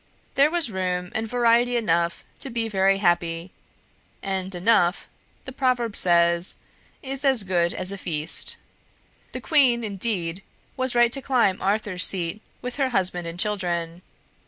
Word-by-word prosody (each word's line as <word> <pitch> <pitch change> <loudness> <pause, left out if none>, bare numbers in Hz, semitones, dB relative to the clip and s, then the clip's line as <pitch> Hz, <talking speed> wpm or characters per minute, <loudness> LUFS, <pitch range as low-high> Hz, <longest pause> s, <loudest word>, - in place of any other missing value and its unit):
There 280 +2 +4
was 330 -7 0
room 180 -1 -2
and 220 0 -2
variety 240 +1 +2
enough 170 -6 0 0.2
to 275 - -5
be 230 -2 -2
very 195 -2 +2
happy, 175 -2 0 0.7
and 190 -1 -3
'enough,' 180 -1 +2 0.4
the 260 - -7
proverb 250 -5 -1
says, 170 0 +3 0.5
'is 270 0 -5
as 265 -6 +3
good 175 -2 +1
as 185 +1 -2
a 200 - -6
feast.' 155 -3 0 0.7
The - - -6
queen, 260 -7 +3
indeed, 195 -4 -2 0.3
was 260 -2 -1
right 240 0 +4
to 275 - -2
climb 240 -8 +1
Arthur's 200 -2 0
Seat 180 +3 0 0.2
with 250 +1 -5
her 270 -2 +1
husband 180 -6 -1
and 165 +1 -7
children. 175 -4 -1
195 Hz, 145 wpm, -24 LUFS, 175-240 Hz, 0.7 s, There